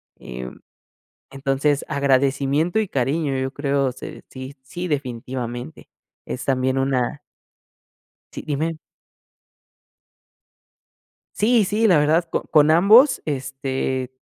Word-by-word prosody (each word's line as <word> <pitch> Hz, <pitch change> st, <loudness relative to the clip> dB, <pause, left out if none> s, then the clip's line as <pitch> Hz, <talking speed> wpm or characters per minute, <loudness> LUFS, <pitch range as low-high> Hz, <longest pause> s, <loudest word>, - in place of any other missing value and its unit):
Em, 65 Hz, 0 st, -9 dB, 0.7 s
entonces, 135 Hz, +1 st, 0 dB
agradecimiento 140 Hz, +4 st, +1 dB
y 215 Hz, -, 0 dB
cariño, 140 Hz, +1 st, -1 dB
yo 130 Hz, 0 st, -2 dB
creo, 140 Hz, -2 st, 0 dB
se -, -, -10 dB
sí 130 Hz, +1 st, -9 dB
sí 175 Hz, +7 st, -6 dB
definitivamente. 125 Hz, -1 st, -5 dB, 0.4 s
Es 125 Hz, -, -5 dB
también 130 Hz, 0 st, +1 dB
una 135 Hz, +1 st, 0 dB, 1.1 s
Sí, -, -, -6 dB
dime. 155 Hz, +2 st, -2 dB, 2.6 s
Sí, 225 Hz, 0 st, +3 dB
sí, 215 Hz, +3 st, +2 dB
la 175 Hz, -5 st, +5 dB
verdad 155 Hz, +4 st, +3 dB
co -, -, -1 dB
con 150 Hz, -1 st, +4 dB
ambos, 215 Hz, -, +6 dB
este, 130 Hz, -2 st, -3 dB
140 Hz, 100 wpm, -22 LUFS, 130-160 Hz, 2.6 s, ambos